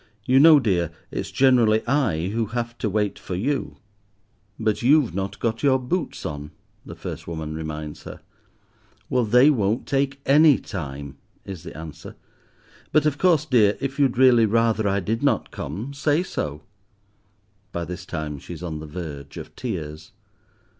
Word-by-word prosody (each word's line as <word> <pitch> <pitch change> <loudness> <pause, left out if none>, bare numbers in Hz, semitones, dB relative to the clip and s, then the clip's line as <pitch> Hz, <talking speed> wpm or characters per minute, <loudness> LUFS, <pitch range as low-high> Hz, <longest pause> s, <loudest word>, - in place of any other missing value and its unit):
"You 130 +1 +5
know, 155 0 +8
dear, 90 - +1 0.2
it's - - -4
generally 120 -5 +3
I 115 - +1
who 110 +1 -1
have 120 +1 -4
to 110 - -1
wait 105 0 -1
for 90 - -5
you." 135 +9 -2 0.8
"But 110 -2 0
you've 135 0 +4
not 95 +1 -3
got 115 -1 -2
your 135 -2 +4
boots 155 +7 -3
on," 75 -1 -5 0.3
the - - -9
first - - -7
woman 80 -2 -5
reminds 75 -1 -6
her. - - -9 0.9
"Well, 125 -2 +2
they 125 +7 +6
won't 110 -3 0
take 140 0 0
any 145 +1 +6
time," 70 -5 -7 0.3
is 95 -4 -7
the - - -10
answer. 80 -1 -9 0.8
"But 155 -1 +3
of 150 -1 0
course, 165 -5 +3
dear, 110 -8 +3
if 135 +1 -4
you'd 135 -4 +2
really 125 -3 +6
rather 115 -1 +2
I 100 0 +1
did 110 +5 -2
not 145 - +1
come, 105 - -6
say 145 +4 +1
so." 75 - -4 1.1
By 85 0 -3
this 90 +2 -7
time 75 -2 -5
she 85 - -9
is 85 - -10
on 80 -3 -4
the 80 - -8
verge 75 -4 -7
of - - -9
tears. 80 -9 -6
110 Hz, 165 wpm, -23 LUFS, 80-135 Hz, 1.1 s, know